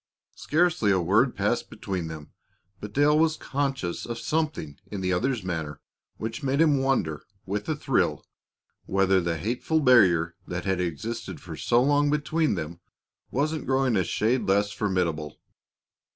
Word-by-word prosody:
Scarcely 160 -8 +1
a 95 -2 +4
word 105 +9 +2
passed - - 0
between 90 -4 -4
them, 80 -2 -9 0.5
but 105 - -7
Dale 145 +5 +4
was 160 -1 +2
conscious 135 -10 -2
of 120 -1 -4
something 150 - -2
in 100 -1 -5
the 95 0 0
other's 120 +3 0
manner 80 -5 -4 0.4
which 115 +5 -5
made 135 0 0
him 150 -4 +4
wonder, 130 - 0 0.2
with 105 +5 -3
a 155 - +1
thrill, 150 - 0 0.6
whether 95 -1 +3
the 85 -1 -1
hateful 120 - 0
barrier 90 - +5
that 90 0 -4
had 95 -2 0
existed 110 +8 -4
for 85 -3 -8
so 120 +8 +2
long 145 +1 +3
between 150 -1 +1
them 85 0 -5 0.5
wasn't 150 +2 -1
growing 130 -2 +2
a 95 - +3
shade 115 +9 0
less 100 +1 +2
formidable. 90 -7 -1
110 Hz, 150 wpm, -26 LUFS, 90-140 Hz, 0.6 s, barrier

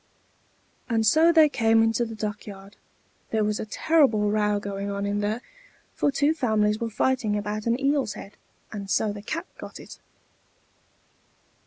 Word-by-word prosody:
And 225 -2 +1
so 315 +9 +5
they 320 -2 +6
came 225 -5 +3
into 225 +1 +1
the 225 -1 -7
duck 215 -1 -5
yard. 195 0 -11 0.5
There 220 -1 0
was 210 0 -1
a - - -5
terrible 220 -6 +2
row 210 -1 +1
going 200 0 -5
on 200 0 -3
in 205 0 -1
there, 215 +4 -2 0.5
for 285 - +1
two 285 +3 +2
families 215 -7 +1
were 230 - -2
fighting 225 -2 0
about 210 +2 -4
an 235 +2 +1
eel's 275 -5 +1
head, 200 +1 -11 0.4
and 200 -2 -7
so 210 +1 +1
the 205 - -8
cat 330 - -4
got - - -9
it. - - -12
215 Hz, 165 wpm, -25 LUFS, 205-250 Hz, 0.5 s, they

